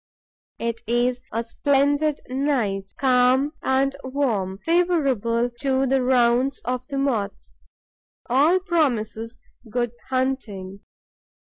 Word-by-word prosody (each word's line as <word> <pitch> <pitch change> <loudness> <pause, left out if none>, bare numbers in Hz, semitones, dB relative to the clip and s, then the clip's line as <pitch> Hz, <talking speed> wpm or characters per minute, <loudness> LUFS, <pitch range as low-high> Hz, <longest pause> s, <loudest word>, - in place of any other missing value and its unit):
It 230 -1 -3
is 245 +1 +1
a 230 +1 -1
splendid 285 +4 +1
night, 250 -8 -1
calm 260 +1 +3
and 270 +1 +1
warm, 235 -9 -1
favourable 270 - +1
to 270 -1 +1
the 265 0 +2
rounds 250 +1 +2
of 255 0 -3
the 275 - -4
Moths. 200 - -3 0.6
All 290 +9 +4
promises 245 - -1 0.3
good 240 +1 -1 0.2
hunting. 235 -8 -2
255 Hz, 100 wpm, -23 LUFS, 230-275 Hz, 0.6 s, All